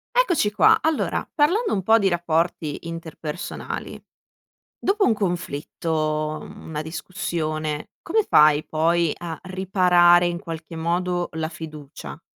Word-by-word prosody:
Eccoci 355 Hz, -, +3 dB
qua. 210 Hz, -, +5 dB
Allora 320 Hz, -1 st, 0 dB
parlando 360 Hz, +10 st, +2 dB
un 195 Hz, -, 0 dB
po' 225 Hz, +3 st, +6 dB
di 200 Hz, -3 st, +2 dB
rapporti 170 Hz, -2 st, -1 dB
interpersonali. 165 Hz, 0 st, -6 dB, 0.8 s
Dopo 400 Hz, +1 st, +1 dB
un 230 Hz, -, +4 dB
conflitto, 155 Hz, -4 st, -2 dB
mhmm, -, -, -11 dB
una 155 Hz, -2 st, -4 dB
discussione, 155 Hz, -3 st, -4 dB
come 430 Hz, +5 st, +1 dB
fai 150 Hz, 0 st, +5 dB
poi 165 Hz, 0 st, +1 dB
a 165 Hz, -2 st, -6 dB
riparare 180 Hz, -2 st, +4 dB
in 175 Hz, 0 st, -1 dB
qualche 165 Hz, -2 st, -8 dB
modo 175 Hz, +2 st, -1 dB
la 160 Hz, 0 st, -2 dB
fiducia? 155 Hz, -3 st, -9 dB
170 Hz, 120 wpm, -23 LUFS, 155-190 Hz, 0.8 s, po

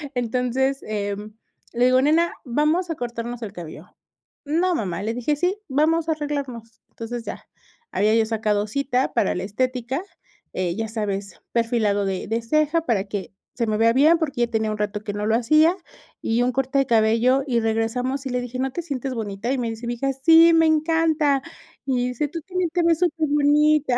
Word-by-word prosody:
Entonces, 250 Hz, +3 st, 0 dB
em, 210 Hz, 0 st, -4 dB, 0.4 s
le 240 Hz, +1 st, +2 dB
digo: 255 Hz, +1 st, +4 dB
"Nena, 320 Hz, +5 st, +3 dB
vamos 300 Hz, +8 st, +1 dB
a 330 Hz, -, -2 dB
cortarnos 240 Hz, -1 st, -5 dB
el 205 Hz, -3 st, -6 dB
cabello". 170 Hz, -1 st, -10 dB, 0.5 s
"No, 340 Hz, +5 st, +1 dB
mamá", 185 Hz, -, -3 dB
le 220 Hz, +2 st, -1 dB
dije: 245 Hz, +5 st, -1 dB
"Sí, 360 Hz, +5 st, +1 dB
vamos 315 Hz, +4 st, +1 dB
a -, -, +3 dB
arreglarnos". 275 Hz, -7 st, -5 dB
Entonces, 235 Hz, +1 st, -6 dB
ya. -, -, -7 dB, 0.4 s
Había 215 Hz, +3 st, +2 dB
yo 225 Hz, -1 st, +3 dB
sacado 215 Hz, -2 st, 0 dB
cita 260 Hz, +2 st, -1 dB
para 200 Hz, -, +1 dB
la 180 Hz, -, -3 dB
estética, 255 Hz, -, -2 dB, 0.5 s
eh, 180 Hz, -2 st, -1 dB
ya 225 Hz, +1 st, -3 dB
sabes, 200 Hz, -3 st, -4 dB
perfilado 225 Hz, -4 st, +1 dB
de 190 Hz, -1 st, -3 dB
de 225 Hz, +3 st, -1 dB
ceja 305 Hz, +7 st, +1 dB
para 215 Hz, -10 st, 0 dB
que 200 Hz, -1 st, -6 dB, 0.2 s
se 235 Hz, -2 st, -1 dB
me 215 Hz, -1 st, 0 dB
vea 230 Hz, +1 st, +4 dB
bien, 305 Hz, +6 st, +5 dB
porque 280 Hz, -6 st, -2 dB
ya 240 Hz, -, +3 dB
tenía 220 Hz, -2 st, -1 dB
un 215 Hz, -, -3 dB
rato 210 Hz, 0 st, -2 dB
que 205 Hz, -, -4 dB
no 205 Hz, 0 st, -3 dB
lo 220 Hz, -, +3 dB
hacía, 310 Hz, +9 st, +4 dB, 0.5 s
y 230 Hz, +2 st, +1 dB
un 250 Hz, -, +1 dB
corte 270 Hz, +2 st, 0 dB
de 275 Hz, -, +1 dB
cabello, 230 Hz, +4 st, +3 dB
y 240 Hz, -3 st, +2 dB
regresamos, 230 Hz, +5 st, -1 dB
y -, -, -4 dB
le 250 Hz, 0 st, -1 dB
dije: 245 Hz, +1 st, -6 dB
"¿No 265 Hz, +1 st, -1 dB
te 345 Hz, -, -4 dB
sientes 275 Hz, -4 st, -4 dB
bonita?", 215 Hz, +1 st, -3 dB
y 270 Hz, -, 0 dB
me 235 Hz, -2 st, -1 dB
dice 225 Hz, +1 st, -7 dB
mi 240 Hz, -, -1 dB
hija: 275 Hz, +3 st, -1 dB
"Sí, 325 Hz, +5 st, +6 dB
me 325 Hz, 0 st, +5 dB
encanta". 315 Hz, -2 st, +2 dB, 0.4 s
Y 250 Hz, -2 st, 0 dB
dice: 250 Hz, +4 st, -2 dB
"Tú 330 Hz, +3 st, -6 dB
tambien 365 Hz, +1 st, -2 dB
te 350 Hz, -, +1 dB
ves 335 Hz, -1 st, +3 dB
superbonita". 300 Hz, -4 st, +2 dB
250 Hz, 195 wpm, -23 LUFS, 220-295 Hz, 0.5 s, Sí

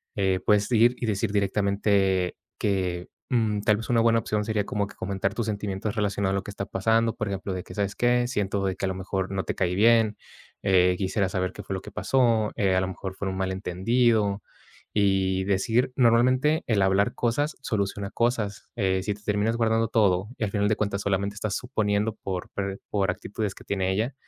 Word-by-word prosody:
eh, 95 Hz, -2 st, +1 dB
puedes 105 Hz, -1 st, +3 dB
ir 120 Hz, +1 st, +5 dB
y 120 Hz, -, -3 dB
decir 105 Hz, 0 st, 0 dB
directamente 100 Hz, -2 st, +1 dB, 0.2 s
que, 90 Hz, -3 st, -1 dB, 0.2 s
mm, 110 Hz, -4 st, +1 dB
tal 105 Hz, 0 st, +3 dB
vez, 115 Hz, -, -7 dB
una 120 Hz, -2 st, +3 dB
buena 115 Hz, 0 st, +4 dB
opción 105 Hz, -1 st, -1 dB
sería 105 Hz, -2 st, 0 dB
como 100 Hz, -1 st, -1 dB
que -, -, -14 dB
comentar 100 Hz, 0 st, -2 dB
tus 115 Hz, -, -1 dB
sentimientos 100 Hz, 0 st, -3 dB
relacionado 100 Hz, -2 st, 0 dB
a -, -, +1 dB
lo 100 Hz, -, -1 dB
que -, -, -7 dB
está 100 Hz, 0 st, -5 dB
pasando, 115 Hz, +4 st, +1 dB
por 110 Hz, -, -3 dB
ejemplo, 95 Hz, 0 st, -3 dB
de 90 Hz, -1 st, -4 dB
que: -, -, -11 dB
"¿Sabes 100 Hz, -1 st, -1 dB
qué? 120 Hz, 0 st, +2 dB
Siento 100 Hz, -5 st, -1 dB
de 95 Hz, -1 st, -1 dB
que, 95 Hz, -, -3 dB
a -, -, 0 dB
lo 95 Hz, -, -3 dB
mejor, 95 Hz, 0 st, -3 dB
no 95 Hz, -1 st, -1 dB
te -, -, -3 dB
caí 90 Hz, -1 st, 0 dB
bien, 110 Hz, +1 st, +4 dB, 0.5 s
eh, 90 Hz, -2 st, +4 dB
quisiera 95 Hz, 0 st, 0 dB
saber 95 Hz, 0 st, -2 dB
qué -, -, -8 dB
fue -, -, -5 dB
lo 95 Hz, -, -5 dB
que 105 Hz, -, -10 dB
pasó, 115 Hz, -1 st, +2 dB
eh, 95 Hz, -2 st, +2 dB
a 95 Hz, -, +3 dB
lo 95 Hz, -, -1 dB
mejor 95 Hz, 0 st, -6 dB
fue 100 Hz, -, -4 dB
un 95 Hz, -, -4 dB
malentendido", 100 Hz, +3 st, +1 dB, 0.5 s
y 95 Hz, -2 st, +2 dB
decir 110 Hz, +6 st, +1 dB
normalmente, 130 Hz, +6 st, +3 dB
el 105 Hz, -4 st, +2 dB
hablar 95 Hz, +1 st, +2 dB
cosas 145 Hz, +6 st, 0 dB
soluciona 100 Hz, -3 st, -2 dB
cosas, 115 Hz, -4 st, -1 dB
eh, 95 Hz, -4 st, +1 dB
si 105 Hz, -, -1 dB
te 105 Hz, -, -19 dB
terminas 105 Hz, +2 st, 0 dB
guardando 115 Hz, -1 st, +2 dB
todo 100 Hz, -4 st, +2 dB
y, -, -, -3 dB
al 100 Hz, -, -4 dB
final 100 Hz, 0 st, +1 dB
de 110 Hz, -, +2 dB
cuentas, 100 Hz, -1 st, -1 dB
solamente 100 Hz, 0 st, 0 dB
estás 105 Hz, -2 st, -3 dB
suponiendo 110 Hz, -3 st, -1 dB
por 95 Hz, -2 st, -4 dB
per 100 Hz, -1 st, -4 dB
por 100 Hz, -1 st, +1 dB
actitudes 105 Hz, -1 st, -4 dB
que -, -, -13 dB
tiene 95 Hz, -2 st, 0 dB
ella, 115 Hz, +7 st, -1 dB
100 Hz, 210 wpm, -26 LUFS, 95-110 Hz, 0.5 s, ir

